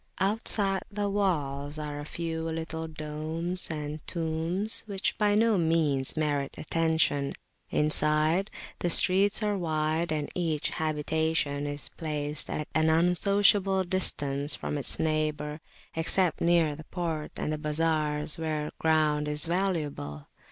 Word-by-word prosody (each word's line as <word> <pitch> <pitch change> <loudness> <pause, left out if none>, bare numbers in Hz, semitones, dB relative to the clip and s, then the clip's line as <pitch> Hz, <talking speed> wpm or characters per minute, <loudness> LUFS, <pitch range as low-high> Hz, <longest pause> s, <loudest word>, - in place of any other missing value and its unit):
Outside 195 -1 +2
the 205 0 -1
walls 145 -8 -1
are 150 -1 -5
a 145 - -6
few 165 +1 -4
little 160 0 -4
domes 160 +3 -3
and 150 -1 -4
tombs, 170 +5 -1
which 195 -2 -1
by 205 -1 +3
no 220 -2 +3
means 160 -5 +1
merit 145 -3 -1
attention. 160 -3 0 0.3
Inside, 155 +5 +4 0.3
the 175 - 0
streets 195 +5 +4
are 210 -1 +1
wide; 160 -1 -1
and 150 -2 -1
each 160 -4 -1
habitation 155 -1 -1
is 145 0 -5
placed 150 -2 -3
at 150 - -3
an 160 0 +3
unsociable 190 +3 +3
distance 145 -6 0
from 145 - -3
its 140 - +4
neighbour, 155 -1 -1 0.3
except 165 +2 +1
near 170 -3 +3
the 155 +1 -11
port 165 -4 -4
and 155 - -2
the 155 - -3
bazars, 150 0 0
where 155 -2 -2
ground 155 -2 +2
is 150 0 +1
valuable. 155 - -2
160 Hz, 130 wpm, -28 LUFS, 150-175 Hz, 0.3 s, Inside